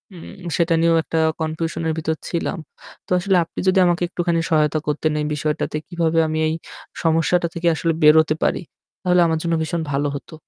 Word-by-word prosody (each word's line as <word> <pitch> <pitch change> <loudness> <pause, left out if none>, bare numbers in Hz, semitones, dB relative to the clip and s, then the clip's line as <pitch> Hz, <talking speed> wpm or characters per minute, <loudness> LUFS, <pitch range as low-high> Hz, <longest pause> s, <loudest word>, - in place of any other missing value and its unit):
উম 180 +1 -10
সেটা 170 0 +2
নিয়েও 165 0 +4
একটা 165 - -2 0.2
confusion 160 +1 -3
এর 160 - 0
ভিতর 160 0 -1
ছিলাম। 170 -1 -2 0.5
তো - - -18
আসলে 190 +2 +1
আপনি 165 - -9
যদি 185 +1 +4
আমাকে 175 0 +1
একটুখানি 170 -1 -1
সহায়তা 155 0 +2
করতেন 150 +1 0
এই - - -2
বিষয়টাতে। 150 +1 -2
কিভাবে 165 -2 -1
আমি 155 0 -2
এই 155 - 0 0.5
সমস্যাটা 165 +2 +2
থেকে 170 +1 -1
আসলে 165 0 0
বেরোতে 155 0 +6
পারি? - - +1 0.4
তাহলে 180 -1 +3
আমার 160 -1 0
জন্য 170 -1 0
ভীষণ 165 +1 -2
ভালো 140 +1 0
হতো। 140 - -9
165 Hz, 185 wpm, -21 LUFS, 155-170 Hz, 0.5 s, বেরোতে